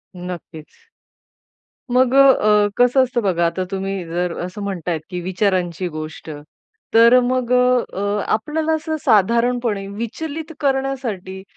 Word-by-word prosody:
नक्कीच. 175 -3 -8 1.3
मग 255 +1 +3
अ, 215 -7 +5
कसं 245 +2 +4
असतं 245 -2 -1
बघा? 175 -4 +1
आता 185 +2 -2
तुम्ही 195 -1 -3
जर 175 +1 -2
असं 185 +3 -7
म्हणतायेत 175 -4 -3
की 180 -1 -4
विचारांची 185 -1 -1
गोष्ट. 155 0 -8 0.6
तर 235 +2 +7
मग 250 0 -1
अ, 250 -5 +1 0.3
आपल्याला 310 +8 -1
असं 315 0 -3
साधारणपणे 230 0 +2
विचलित 290 +10 -6
करण्यासाठी 260 -9 -2
210 Hz, 115 wpm, -20 LUFS, 180-250 Hz, 1.3 s, तर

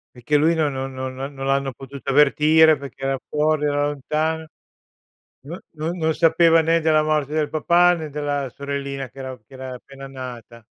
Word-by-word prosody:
Perché 135 +5 +1
lui 160 +3 +3
non 155 -3 +1
non 135 0 -5
non 130 0 -5
non 135 +2 -6
non 135 0 -6
l'hanno 135 -1 0
potuta 135 +1 -9
avvertire 150 +2 +5
perché 135 -1 -10
era 135 0 -1
fuori, 150 0 +1
era 145 0 +1
lontano. 155 +3 -2 1.0
No 170 +4 -7
non 165 +3 -4
non 160 -1 0
sapeva 165 0 +4
né 165 +1 +2
della 155 -1 +3
morte 155 -2 0
del 155 -1 0
papà 175 +3 +4
né 155 -2 -6
della 145 -2 -2
sorellina 140 -2 -5
che 135 - -24
era 130 -1 -6
che 135 - -19
era 130 -1 -7
appena 135 +2 -11
appena - - -8 0.3
nata. 115 0 -16
145 Hz, 190 wpm, -22 LUFS, 135-155 Hz, 1.0 s, avvertire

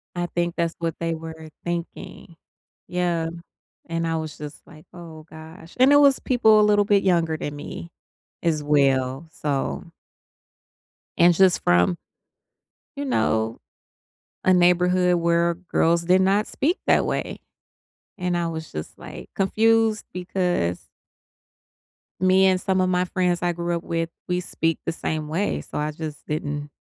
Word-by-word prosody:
I 175 - -1
think 175 0 -2
that's 170 -1 -1
what 165 -1 -2
they 165 0 -1
were 160 0 -9
thinking. 170 0 -6 0.5
Yeah, 175 -2 -1 0.6
and 165 0 -2
I 165 - 0
was 155 -2 -5
just 150 0 -9
like, 155 0 -16
"Oh 160 -3 -11
gosh," 160 +1 -12
and 260 +3 +6
it 290 - +7
was 280 -2 +5
people 220 -4 +4
a - - +5
little 205 -1 +4
bit 200 -1 +3
younger 170 -4 +2
than 145 -1 -5
me 170 +3 -8 0.5
as 160 -3 0
well, 135 0 +1
so 135 - -2 1.3
And 175 +1 +6
just 185 +1 +3
from 90 - +3 1.0
you 285 - -3
know, 110 - 0 0.9
a 185 - +5
neighborhood 180 0 +3
where 170 0 +2
girls 170 -1 0
did 180 +2 +4
not 195 +3 +2
speak 335 +7 -1
that - - +4
way. - - -3 0.8
And 180 -2 -1
I 170 - -1
was 160 -1 -6
just, 75 - -7
like, - - -10
confused 220 +2 +2
because 180 - -2 1.3
me 185 +1 +4
and 185 -1 +3
some 190 0 0
of 185 - +1
my 180 0 +1
friends 180 -1 0
I 175 -1 +1
grew 170 0 -2
up 170 - -5
with, 165 0 -2 0.2
we 180 0 0
speak 165 -2 -2
the - - 0
same 155 -2 -3
way, 185 +7 -1
so - - -8
I 150 +1 -1
just 155 -1 -7
didn't 145 -1 -4
170 Hz, 150 wpm, -23 LUFS, 160-185 Hz, 1.3 s, it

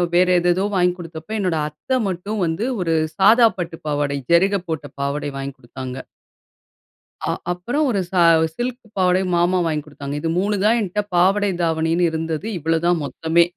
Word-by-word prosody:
வேற 180 +1 +4
ஏதேதோ 175 +3 +1
வாங்கி 180 -1 +3
குடுத்ப்ப, 165 +4 -6
என்னோட 180 -5 0
அத்தை 205 - -2
மட்டும் 200 +4 -3
வந்து 165 +8 -1 0.2
ஒரு 165 -2 +1 0.2
சாதா 225 +5 +6
பட்டு 170 -1 -4
பாவாடை 145 -1 0
ஜருக 195 +3 +4
போட்ட 160 -2 -3 0.2
பாவாடை 140 +1 -2
வாங்கி 135 0 -5
குடுத்தாங்க. 130 +1 -7 1.3
அ - - -1 0.2
அப்புறம் 240 +13 -1
ஒரு 210 -5 +1
ச - - -21 0.4
சில்க் 245 +1 -3 0.2
பாவடை 185 0 +3
மாமா 175 +2 +2
வாங்கி 155 -2 -1
குடுத்தாங்க. 145 -1 -7
இது 165 - -1
3 205 +2 0
தான் 230 +2 +4
என்ட்ட 205 +1 -1
பாவாடை 195 +3 +3
தாவணின்னு 165 +1 +1
இருந்தது. 160 +3 -3
இவ்வளவு 165 +2 0
தான் 175 -2 +2
மொத்தமே! 160 +5 +2
175 Hz, 160 wpm, -21 LUFS, 160-195 Hz, 1.3 s, சாதா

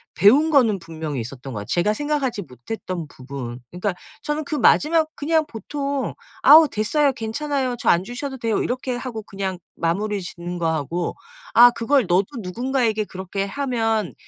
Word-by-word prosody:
배운 265 - +5
거는 230 -9 +4
분명히 160 -5 -5
있었던 125 +3 -7
거야. 105 -2 -4
제가 175 - +1
생각하지 275 -4 -1
못했던 165 - -6
부분 130 -2 -7
그러니까 180 +3 -2 0.3
저는 295 0 -2
그 305 - -3
마지막 310 +2 +4
그냥 315 +1 +1
보통 280 +4 -3 0.3
"아우 310 0 +9
됐어요. 275 +7 +2
괜찮아요 260 +3 -2
저 - - 0
안 175 +2 +3
주셔도 265 +4 -5
돼요." 225 -3 0
이렇게 255 0 -2
하고 240 -3 -5
그냥 190 -3 -4 0.2
마무리 200 +5 -1
짓는 175 0 -6
거 165 -1 +1
하고 165 +3 -2 0.4
"아 240 +1 +9
그걸 255 +2 +2
너도 180 +3 +3
누군가에게 230 +2 0
그렇게 190 0 -4
하면 225 - -1
220 Hz, 350 characters per minute, -22 LUFS, 175-270 Hz, 0.4 s, 아우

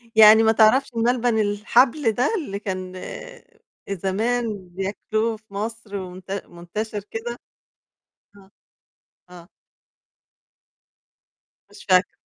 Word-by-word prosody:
يعني 220 0 +9
ما 220 - +5
تعرفش 225 +4 +4
الملبن 235 0 +1
الحبل 225 +5 +2
ده، 245 +6 +1
اللي 275 - -4
كان 185 -2 -5 1.0
زمان 200 +1 -2
بياكلوه 215 +4 -2
في 215 -1 -24
مصر 215 0 -5
ومنت 185 0 -8 0.2
منتشر 205 +5 -5
كده؟ 240 +2 -5 1.0
آه، 195 -1 -19 0.8
آه. 175 -1 -13 2.2
مش 205 0 -15
فاكرة. 185 0 +4
215 Hz, 95 wpm, -23 LUFS, 195-230 Hz, 2.2 s, يعني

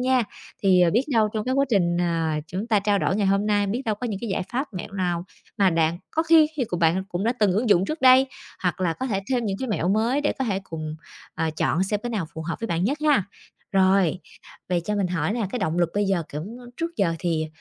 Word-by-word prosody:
nha. 255 0 +3 0.4
Thì, 185 -2 +5
ờ, 175 -1 +5
biết 230 - +3
đâu 220 -2 +3
trong 215 - -1
cái 255 +1 0
quá 275 +1 +3
trình, 175 -5 +2
ờ, 165 -2 0 0.2
chúng 190 +7 -4
ta 220 -3 +3
trao 200 0 +2
đổi 195 - 0
ngày 205 -2 +1
hôm 195 +2 +2
nay, 205 -1 +2
biết 230 +7 -2
đâu 220 - 0
có 245 +4 -5
những 205 -4 -3
cái 235 - -4
giải - - -1
pháp, 265 +4 -1
mẹo 180 - -6
nào 180 -3 -1 0.3
mà 195 -2 +4
đạn 165 -1 +2 0.2
có 320 - +1
khi 325 -1 +6
thì 260 - +1
của 180 - -4
bạn 170 +2 +2
cũng 180 +3 -3
đã 235 - +2
từng 210 -7 +2
ứng 220 +4 0
dụng 190 -2 +4
trước 310 +5 -4
đây 260 0 +7 0.4
hoặc 180 0 -1
là 175 -3 +1
có 260 +10 -4
thể 195 -5 -1
thêm 245 -2 +1
những 195 -1 -1
cái 260 - -3
mẹo 185 -4 0
mới 225 +7 +2
để 290 - +1
có 265 - 0
thể 195 -5 -1
cùng, 155 -3 -6 0.4
ờ, 160 - -1
chọn 175 - +1
xem 205 +1 -1
cái 240 - -3
nào 205 -8 -2
phù 160 - -5
hợp 165 - -2
với 230 - -2
bạn 170 -2 -1
nhất 280 +7 0
ha? 270 -11 +4 0.5
Rồi, 190 -2 +3 0.5
vậy 175 -1 +1
cho 210 - -1
mình 200 -3 +1
hỏi 175 0 -1
nè, 225 -3 -1
cái 250 - -3
động 175 -5 -1
lực 175 -1 +2
bây 205 0 +2
giờ, 190 -3 +1
kiểu, 150 +1 -4 0.3
trước 335 +1 -4
giờ 170 -4 +1
thì, 165 -3 -1
195 Hz, 270 wpm, -24 LUFS, 175-235 Hz, 0.5 s, đây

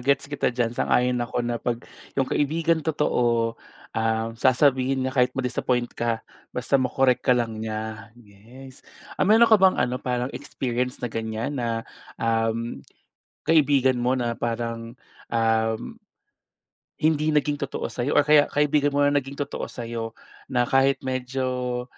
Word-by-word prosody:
Gets 140 +2 0
kita 145 - +1
diyan, 120 -2 -1
sang-ayon 125 0 +1
ako 120 0 -4
na 120 -1 -2
'pag 120 -1 -3 0.3
'yung 135 - +3
kaibigang 160 +4 +1
totoo, 120 -7 0 0.3
ah, 110 0 0
sasabihin 130 0 +3
niya 130 - -2
kahit 125 -1 +2
madis-appoint 125 -1 -1
ka, 115 -1 -2 0.2
basta 130 +2 0
ma-correct 125 0 +2
ka 125 - +3
lang 115 -2 -2
niya. 110 0 -5
Yes. 120 +5 -15 0.4
Um, - - +3
meron 225 +2 +7
ka 220 -3 +5
bang 190 -1 +5
ano, 125 +1 0
parang 125 +1 -2
experience 125 0 -3
na 120 - -4
ganyan 115 +4 -3
na, 115 -1 -2 0.3
uhm, 115 -4 -1 0.6
kaibigan 140 -5 +3
mo 125 +2 +1
na 120 -2 -1
parang, 115 0 -4 0.3
uhm 115 - 0 1.0
hindi 155 0 +2
naging 150 0 +1
totoo 140 -1 -4
sa'yo 125 +3 -2
or - - +6
kaya 150 0 +5
kaibigan 145 -1 +1
mo 145 - +3
na 145 0 +4
naging 135 0 -6
totoo 140 0 -4
sa'yo 115 -1 -6 0.3
na 125 - +1
kahit 135 +2 +2
medyo 130 -1 -2
125 Hz, 145 wpm, -24 LUFS, 115-140 Hz, 1.0 s, meron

